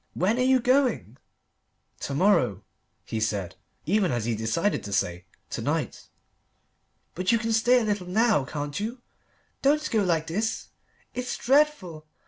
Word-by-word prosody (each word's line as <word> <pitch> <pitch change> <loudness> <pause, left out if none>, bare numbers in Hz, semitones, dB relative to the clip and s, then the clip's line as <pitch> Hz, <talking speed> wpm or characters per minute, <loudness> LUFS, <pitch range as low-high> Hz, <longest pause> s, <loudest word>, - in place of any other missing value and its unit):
When 210 +7 +1
are - - +2
you 260 0 +4
going?" 245 - +1 0.8
"To 140 - -4
morrow," 130 - +2 0.4
he 110 - -3
said, 100 -4 -2 0.3
even 190 +2 +2
as 120 -3 -1
he 120 - 0
decided 115 - -1
to 100 - -6
say, 90 -3 -1 0.3
"to - - -3
night." - - -3 1.1
"But 185 +1 0
you 230 - +4
can 225 0 -1
stay 240 +3 +4
a - - -1
little 205 -4 -2
now, 215 - +2
can't 145 +4 -4
you? 235 +4 -5 0.6
Don't 300 +2 +2
go 220 -3 +2
like 165 -4 +1
this. 210 +7 -2 0.4
It's 250 0 -3
dreadful. 245 - +1
190 Hz, 150 wpm, -26 LUFS, -, 1.1 s, you